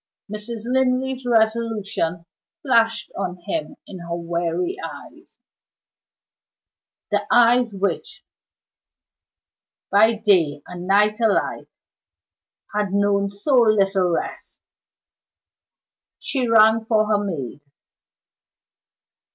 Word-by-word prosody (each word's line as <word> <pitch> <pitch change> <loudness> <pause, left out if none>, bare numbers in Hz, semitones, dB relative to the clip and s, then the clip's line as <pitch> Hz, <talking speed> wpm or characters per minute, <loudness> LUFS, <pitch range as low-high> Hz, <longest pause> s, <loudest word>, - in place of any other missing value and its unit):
Mrs. 215 +1 -6
Linley's 260 0 0
resolution 220 -7 0 0.4
flashed 230 -4 +1
on 185 -2 -4
him 310 -3 -4
in 190 - -10
her 170 0 -5
weary 170 - -2
eyes - - -11 1.7
the - - +2
eyes 240 -2 +4
which, 195 +1 -3 1.7
by 220 +3 +5
day 175 -10 +2
and 180 0 -8
night 210 +3 +3
alike, 220 -3 0 1.1
had 205 -2 -1
known 200 0 +1
so 200 +8 -3
little 195 -4 +2
rest. 170 - -4 1.6
She 260 -3 -2
rang 220 0 +5
for 220 -1 +2
her 210 -1 +1
maid. 150 -8 -5
210 Hz, 85 wpm, -21 LUFS, 190-230 Hz, 1.7 s, by